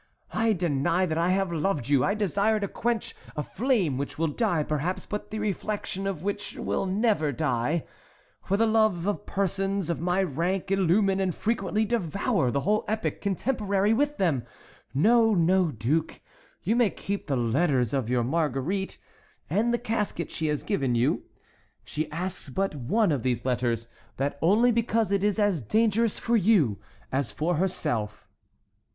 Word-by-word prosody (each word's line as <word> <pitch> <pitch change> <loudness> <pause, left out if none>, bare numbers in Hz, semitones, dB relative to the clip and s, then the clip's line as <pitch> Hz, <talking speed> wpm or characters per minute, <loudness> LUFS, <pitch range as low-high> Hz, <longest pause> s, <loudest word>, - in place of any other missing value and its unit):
I 225 0 +2
deny 170 0 +1
that 160 -2 -1
I 170 +2 +2
have 190 -1 +1
loved 160 -5 -1
you! 140 -3 +3
I 200 - +1
desire 210 +1 +1
to 200 - 0
quench 235 +3 -2 0.2
a 150 - -2
flame 205 - 0
which 140 - -4
will 165 0 +1
die, 175 -2 +1
perhaps, 155 +5 -2
but 210 - -5
the 215 - -4
reflection 205 -1 -3
of 185 -5 -3
which 205 +1 -3
will 195 - -1
never 195 -6 +1
die! 145 +2 0 0.6
For 200 - 0
the 225 - +3
loves 215 -6 +2
of 205 0 -2
persons 195 -2 -1
of 170 - -3
my 180 +3 +1
rank 180 +4 -1
illumine 195 +1 +3
and 185 -3 0
frequently 215 -1 0
devour 200 - 0
the 140 +3 0
whole 210 +5 +1
epoch 220 +1 -2
contemporary 200 0 +1
with 290 +5 +1
them. 160 -10 +1 0.5
No, 225 - +4
no, 180 +1 +3
duke; 145 +7 -1 0.4
you 215 +6 +1
may 240 -3 +4
keep 200 +1 -5
the 140 -3 0
letters 125 0 +1
of 130 -5 -1
your 125 -1 +2
Marguerite, 160 +6 -1 0.5
and 230 +4 +2
the 240 - +2
casket 210 -7 -2
she 160 - -2
has 150 -1 -1
given 135 - 0
you. 120 +2 +1 0.6
She 155 +1 -3
asks 180 -1 -4
but 195 +8 -1
one 165 - +1
of 140 -5 0
these 125 -1 -1
letters, 120 -2 0
and 115 - -26 0.3
that 140 +1 -2
only 215 +9 +4
because 225 -2 +1
it 200 -1 +1
is 205 -1 +2
as 205 -7 +2
dangerous 220 - +2
for 235 - 0
you 185 - +3 0.3
as 135 -1 -1
for 165 +2 -1
herself." 145 - -2
185 Hz, 170 wpm, -27 LUFS, 150-210 Hz, 0.6 s, No